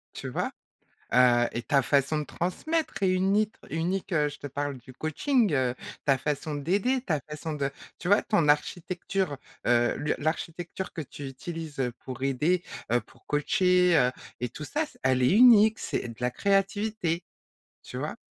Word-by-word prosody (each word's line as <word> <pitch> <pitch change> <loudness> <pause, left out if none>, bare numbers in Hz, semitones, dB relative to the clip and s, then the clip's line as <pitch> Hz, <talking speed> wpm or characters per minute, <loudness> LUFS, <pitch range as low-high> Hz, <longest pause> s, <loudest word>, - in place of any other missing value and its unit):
Tu - - -5
vois? - - -2 0.6
Heu 120 -1 +5
et 120 - -3
ta 140 +2 +3
façon 140 +3 +2
de 150 - -2
transmettre 200 - -2
est 190 - +4
unit 195 +3 +2 0.2
unique, 180 +5 -2
heu, 150 -3 +3
je 145 0 -10
te - - -6
parle 145 0 -3
du 130 +1 -13
coaching, 210 - +1
heu, 130 -2 +1 0.3
ta 140 -2 +3
façon 150 +2 -2
d'aider, 200 - +1
ta 170 - -1
façon 155 +2 -6
de 140 -1 -1 0.3
tu 175 - -4
vois? 205 +2 +5
Ton 200 -8 +2
architecture, 175 +1 0 0.3
heu, 120 0 +3
le 150 - -1
l'architecture 170 +4 -3
que - - -5
tu 145 -1 -7
utilises, 155 +3 -7
heu, 125 -2 0
pour 130 -1 -7
aider, 150 +7 +1 0.3
heu, 120 - +4
pour 120 +1 -22
coacher, 180 +4 +3
heu 125 -4 +4 0.3
et 125 -1 -2
tout 150 - -7
ça, 300 - -1
c 300 - -15
elle 130 -1 +2
est 125 - +4
unique, 220 -1 +7
c'est - - -3
de 115 - -7
la 125 0 +1
créativité. 195 - 0 0.6
Tu - - -7
vois? - - -4
155 Hz, 175 wpm, -28 LUFS, 135-190 Hz, 0.6 s, unique